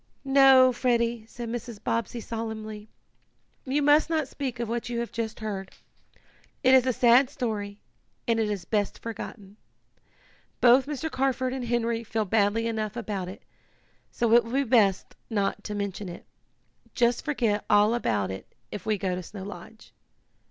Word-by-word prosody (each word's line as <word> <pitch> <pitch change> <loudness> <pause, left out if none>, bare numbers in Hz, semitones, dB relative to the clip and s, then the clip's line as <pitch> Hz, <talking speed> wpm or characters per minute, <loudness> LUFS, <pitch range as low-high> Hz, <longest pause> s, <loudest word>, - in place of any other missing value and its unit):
"No, 270 -2 +6
Freddie," 235 -2 0
said 240 +1 -7
Mrs. 235 -1 -5
Bobbsey 230 +1 -2
solemnly. 220 -2 -6 0.8
"You 280 +2 0
must 295 +3 +4
not 315 -4 0
speak 260 -3 -5
of 235 - -2
what 235 +2 -3
you 240 - -3
have 235 - -4
just 225 -1 -4
heard. 195 -3 -4 0.9
It 260 0 +5
is 260 -1 +6
a - - +4
sad 245 +2 +5
story, 210 -6 -4 0.5
and 230 -1 +2
is 210 -5 -1
best 205 -2 -1
forgotten. 210 -3 -8 1.0
Both 255 +2 +5
Mr. 300 +2 -4
Carford 260 -1 0
and 260 -2 -4
Henry 235 -1 0
feel 220 -1 -2
badly 210 +2 +2
enough 220 -2 -2
about 200 -5 -3
it, 190 - -11 0.7
so 235 -1 0
it 235 0 +7
will 230 +2 -8
be 275 +1 +2
best 220 -6 +2
not 205 -4 -1
to 210 - -4
mention 200 -1 -4
it. 175 - -10 0.7
Just 235 -1 +2
forget 230 -8 0
all 210 +2 +5
about 105 - 0
it 95 - -9 0.2
if 210 - -7
we 215 -1 +1
go 185 -1 -2
to 180 - -3
Snow 190 +2 -9
Lodge." 210 +2 -11
230 Hz, 160 wpm, -27 LUFS, 210-250 Hz, 1.0 s, it